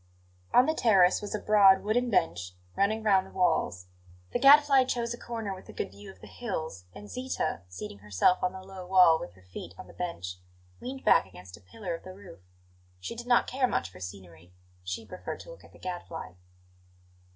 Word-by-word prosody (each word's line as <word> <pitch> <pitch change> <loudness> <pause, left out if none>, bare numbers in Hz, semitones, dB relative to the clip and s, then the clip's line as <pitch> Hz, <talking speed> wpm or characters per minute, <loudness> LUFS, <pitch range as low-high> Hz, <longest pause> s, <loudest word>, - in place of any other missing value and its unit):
On 250 - +6
the 315 - +1
terrace 195 - +4
was 205 0 -4
a - - -2
broad 200 -3 +5
wooden 240 +4 +1
bench 90 - 0 0.2
running 215 +2 +1
round 190 -3 +3
the - - -15
walls. 160 - 0 0.5
The - - +1
Gadfly 275 0 +7
chose 235 -2 -2
a - - -7
corner 225 -4 -4
with 185 - -12
a - - -9
good - - -4
view 100 +1 -12
of 95 -1 -14
the - - -11
hills, 160 - -5
and 105 0 -10
Zita, 255 - -3
seating 95 +3 -8
herself 105 - +2
on 180 - +1
the 190 0 -10
low 190 -1 -9
wall 180 -3 +6
with 85 - -8
her 95 0 -21
feet 90 -1 -9
on - - -9
the - - -15
bench, 90 - -5 0.4
leaned 265 +2 -7
back - - +5
against 90 0 -12
a 105 - -18
pillar 175 - -6
of 165 - -7
the 185 0 -10
roof. 190 - -13 0.6
She 90 - -6
did 240 +1 -8
not 240 -1 +4
care 255 0 0
much 95 - -2
for 90 - -14
scenery; 90 -2 -10 0.3
she 90 +5 -5
preferred 185 - -7
to - - -11
look - - -14
at - - -17
the - - -17
Gadfly. 175 -2 -6
185 Hz, 205 wpm, -29 LUFS, -, 0.6 s, Gadfly